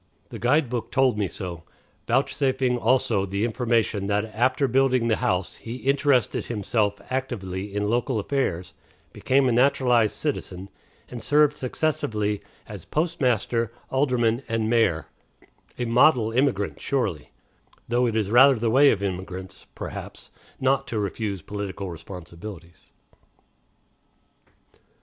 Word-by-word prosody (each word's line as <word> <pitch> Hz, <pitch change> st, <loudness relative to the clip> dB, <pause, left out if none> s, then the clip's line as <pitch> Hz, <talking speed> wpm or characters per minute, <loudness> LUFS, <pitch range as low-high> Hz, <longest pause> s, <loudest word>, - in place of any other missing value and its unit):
The -, -, -8 dB
guide 140 Hz, +4 st, +2 dB
book 120 Hz, -1 st, -4 dB
told 135 Hz, -4 st, +3 dB
me 105 Hz, -2 st, 0 dB
so, 90 Hz, -4 st, -6 dB, 0.5 s
vouchsafing 130 Hz, -2 st, +1 dB
also 120 Hz, -4 st, +2 dB
the 100 Hz, +3 st, -1 dB
information 115 Hz, -4 st, 0 dB
that 105 Hz, +1 st, +1 dB
after 130 Hz, +5 st, +2 dB
building 130 Hz, -1 st, +2 dB
the 110 Hz, -, +2 dB
house 90 Hz, 0 st, -1 dB
he 115 Hz, +1 st, -7 dB
"interested 135 Hz, -1 st, +1 dB
himself 105 Hz, -2 st, -1 dB
actively 100 Hz, -7 st, -4 dB
in 105 Hz, 0 st, 0 dB
local 120 Hz, +2 st, 0 dB
affairs, 100 Hz, -7 st, -2 dB, 0.4 s
became 135 Hz, 0 st, +2 dB
a -, -, +2 dB
naturalized 125 Hz, -3 st, +3 dB
citizen, 100 Hz, -10 st, -4 dB, 0.4 s
and 120 Hz, -2 st, -7 dB
served 150 Hz, +5 st, +3 dB
successively 110 Hz, -7 st, -1 dB, 0.2 s
as -, -, -9 dB
postmaster, 125 Hz, -, 0 dB, 0.2 s
alderman, 125 Hz, -3 st, +1 dB
and 115 Hz, -1 st, -1 dB
mayor" 110 Hz, -9 st, +2 dB, 0.7 s
a 125 Hz, -, -2 dB
model 120 Hz, -1 st, +4 dB
immigrant, 115 Hz, -5 st, 0 dB
surely, 110 Hz, -, -2 dB, 0.6 s
though 120 Hz, +1 st, +2 dB
it 115 Hz, -, -2 dB
is 105 Hz, -2 st, 0 dB
rather 135 Hz, +3 st, +7 dB
the 115 Hz, -1 st, 0 dB
way 140 Hz, +4 st, +6 dB
of 100 Hz, -5 st, 0 dB
immigrants, 95 Hz, -1 st, -6 dB
perhaps, -, -, -7 dB, 0.3 s
not 135 Hz, +1 st, +1 dB
to 115 Hz, -, -3 dB
refuse 100 Hz, -2 st, -3 dB
political 100 Hz, -2 st, -5 dB
responsibilities. 85 Hz, +1 st, -10 dB
115 Hz, 125 wpm, -25 LUFS, 100-130 Hz, 0.7 s, rather